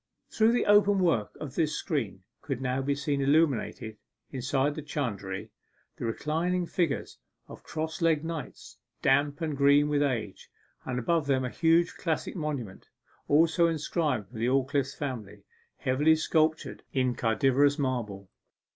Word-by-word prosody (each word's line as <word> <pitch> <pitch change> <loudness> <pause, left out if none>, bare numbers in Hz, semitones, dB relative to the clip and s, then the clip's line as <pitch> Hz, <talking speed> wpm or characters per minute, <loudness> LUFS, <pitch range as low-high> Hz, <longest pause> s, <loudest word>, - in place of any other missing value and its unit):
Through 220 +1 +3
the 245 - +1
open 205 -1 +5
work 165 - +1
of 140 -4 -6
this 155 -2 0
screen 115 - -3 0.2
could 135 -4 -4
now 130 0 -1
be 140 +1 0
seen 140 0 -1
illuminated, 135 -7 +1 0.3
inside 135 +2 0
the 155 - -6
chantry, 105 -10 -4 0.5
the - - -4
reclining 165 +9 -1
figures 170 -3 -2 0.3
of - - -11
cross 160 +2 -5
legged 160 -2 +2
knights, 165 -2 -7 0.2
damp 145 +2 +2
and 155 -3 -2
green 140 +1 +4
with 145 -1 +1
age, 115 -8 -2 0.4
and 125 -1 -3
above 155 +4 0
them 130 -2 +1
a 125 - -4
huge 165 +1 +3
classic 165 +2 -2
monument, 145 - -5 0.4
also 165 +3 +4
inscribed 150 - -1
to 115 - -8
the 115 - +1
Aldclyffe 135 +1 0
family, 125 -9 -6 0.3
heavily 145 +5 +3
sculptured 155 0 0
in 130 -2 +1
cadaverous 135 +5 +2
marble. 115 -9 -3
145 Hz, 145 wpm, -28 LUFS, 130-160 Hz, 0.5 s, open